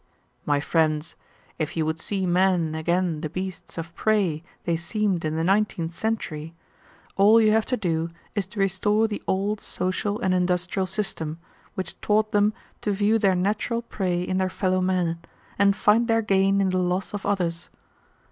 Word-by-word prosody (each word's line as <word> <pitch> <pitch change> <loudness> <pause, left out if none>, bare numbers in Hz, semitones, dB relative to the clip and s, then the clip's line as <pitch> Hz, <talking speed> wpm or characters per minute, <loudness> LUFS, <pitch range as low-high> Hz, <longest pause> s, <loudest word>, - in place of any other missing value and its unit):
"My 145 -1 +3
friends, 155 0 0 0.4
if 160 +2 -3
you 160 - +1
would 160 +1 -2
see 190 +2 -2
men 180 -2 +2
again 170 0 0
the 155 - -3
beasts 185 +2 -6
of 165 0 -6
prey 195 -8 +1 0.2
they 170 - 0
seemed 180 +2 -1
in 155 0 -1
the 160 - 0
nineteenth 190 -3 +1
century, 165 -7 -3 0.6
all 210 +3 +7
you 215 -1 +4
have 220 0 +2
to 250 - +1
do 165 -4 -1 0.2
is 205 -4 -1
to 210 +1 -8
restore 205 +3 +2
the 210 -2 -5
old 200 +2 0
social 195 +3 -2
and 190 -6 +1
industrial 180 +1 0
system, 175 -5 -2 0.4
which 185 -1 -5
taught 215 +1 +2
them 205 0 +3 0.3
to 210 - 0
view 205 +3 +2
their 195 -3 +3
natural 210 +5 0
prey 180 -6 -1
in 185 +1 -1
their 185 0 +1
fellow 185 -1 0
men, 180 -3 0 0.4
and 200 0 +5
find 215 +4 +3
their 225 -1 +2
gain 195 -1 +3
in 190 - +2
the 185 0 +1
loss 180 +2 -1
of 205 - -4
others. 175 -4 -1
185 Hz, 175 wpm, -25 LUFS, 170-205 Hz, 0.6 s, all